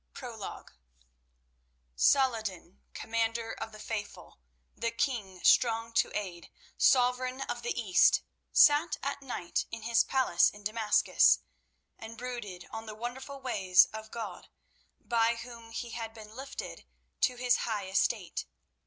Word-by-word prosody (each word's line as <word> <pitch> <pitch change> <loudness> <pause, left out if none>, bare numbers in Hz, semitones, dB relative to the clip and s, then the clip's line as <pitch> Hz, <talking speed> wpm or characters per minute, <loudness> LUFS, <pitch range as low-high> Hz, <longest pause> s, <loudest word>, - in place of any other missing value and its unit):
PROLOGUE 235 -7 -7 1.3
Salah 260 - +4
ed 220 - -10
din, 185 -2 -7
Commander 225 0 -1
of 225 - -6
the 215 - -11
Faithful, 205 - -6 0.4
the 230 - -1
king 225 -6 -3
Strong 230 -1 +4
to 230 - +2
Aid, 180 -5 -6 0.3
Sovereign 255 +1 +3
of 240 -3 -4
the 240 0 -2
East, 190 -6 +4 0.3
sat 295 +3 +5
at 280 +1 -3
night 245 -10 -3
in 230 -1 -7
his 230 0 +3
palace 260 -10 +3
at 205 - -13
Damascus 215 0 +3 0.6
and 225 0 -9
brooded 235 -8 -6
on 225 0 -7
the 215 - -7
wonderful 255 +5 -6
ways 195 -8 +4
of 220 0 -7
God, 215 -6 -7 0.5
by 230 -1 +1
Whom 230 -1 -10
he 235 +1 -5
had 225 -1 -6
been 215 -1 -12
lifted 270 +2 -7 0.3
to 250 - +2
his 245 0 +2
high 210 -4 -2
estate. 190 +1 -1
230 Hz, 135 wpm, -30 LUFS, 210-245 Hz, 1.3 s, sat